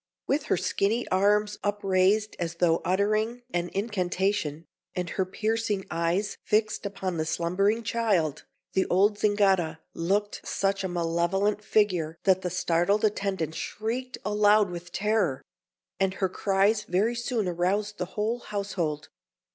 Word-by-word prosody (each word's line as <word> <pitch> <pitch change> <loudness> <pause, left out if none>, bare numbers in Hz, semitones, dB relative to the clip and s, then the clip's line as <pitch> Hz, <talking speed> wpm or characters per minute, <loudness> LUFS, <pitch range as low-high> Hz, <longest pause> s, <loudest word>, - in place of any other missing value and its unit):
With 280 +1 0
her - - +1
skinny 215 +7 0
arms 210 +2 +2
upraised 205 +1 +2
as 170 -1 -3
though 170 -1 +2
uttering 215 +6 0
an 175 0 -1
incantation, 190 -5 -1 0.3
and 180 -2 -3
her 190 - 0
piercing 215 -1 -1
eyes 175 +5 -1
fixed 215 -1 +1
upon 190 -3 -4
the 155 - 0
slumbering 195 +8 +1
child, 200 -9 0 0.3
the 190 - +2
old 205 +3 +3
Zingara 195 -6 +2
looked 200 +5 -1
such 195 0 -1
a - - 0
malevolent 175 +4 0
figure 180 -8 +1
that 190 -1 +4
the 180 - -2
startled 180 +4 +1
attendant 195 -6 -1
shrieked 235 +9 -4
aloud 210 -1 +4
with 175 0 -8
terror; 200 -9 0 0.6
and 190 -1 +1
her 190 -1 0
cries 200 +3 +2
very 200 +7 +1
soon 240 -3 -1
aroused 195 +4 -1
the 180 - -1
whole 220 +3 0
household. 190 -9 -3
195 Hz, 135 wpm, -27 LUFS, 175-210 Hz, 0.6 s, that